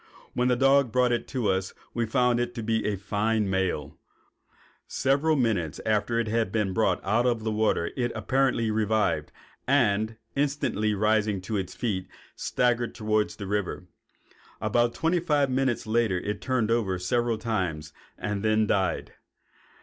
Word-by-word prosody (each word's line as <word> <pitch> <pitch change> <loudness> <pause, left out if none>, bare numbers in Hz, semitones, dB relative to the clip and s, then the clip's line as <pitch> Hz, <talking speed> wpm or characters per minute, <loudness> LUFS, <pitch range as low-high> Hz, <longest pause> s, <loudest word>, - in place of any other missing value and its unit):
When 125 0 +1
the 125 - +3
dog 135 -1 +4
brought 125 +1 +3
it 120 - -1
to 125 -6 -2
us 95 0 -2 0.2
we 120 -1 -1
found 125 +1 +2
it 120 0 -2
to 115 - -4
be 110 0 0
a 105 - 0
fine 105 +2 0
male. 95 -6 -2 0.9
Several 140 +4 +2
minutes 110 - 0
after 110 +2 +1
it 115 - -1
had 110 -2 0
been 105 -3 0
brought 95 -3 +2
out 115 +5 +2
of 115 -3 0
the 110 - -1
water 105 -6 +1
it 120 -2 -1
apparently 120 0 +1
revived, 105 -8 0 0.4
and, 110 -5 +2 0.2
instantly 135 -7 0
rising 105 -1 +1
to 105 +4 -4
its 95 -3 -3
feet, 95 -6 -2 0.3
staggered 120 -1 0
toward 110 -1 +1
the 100 - -8
river. 105 -1 -2 0.7
About 120 0 +1
twenty 170 +2 +1
five 145 -5 +1
minutes 130 -2 0
later 110 -3 +1
it 105 +3 -4
turned 125 -4 0
over 105 -6 +1
several 120 +5 0
times 90 -9 -3 0.2
and 100 +1 -3
then 110 0 +3
died. 95 -2 0
110 Hz, 155 wpm, -27 LUFS, 105-120 Hz, 0.9 s, dog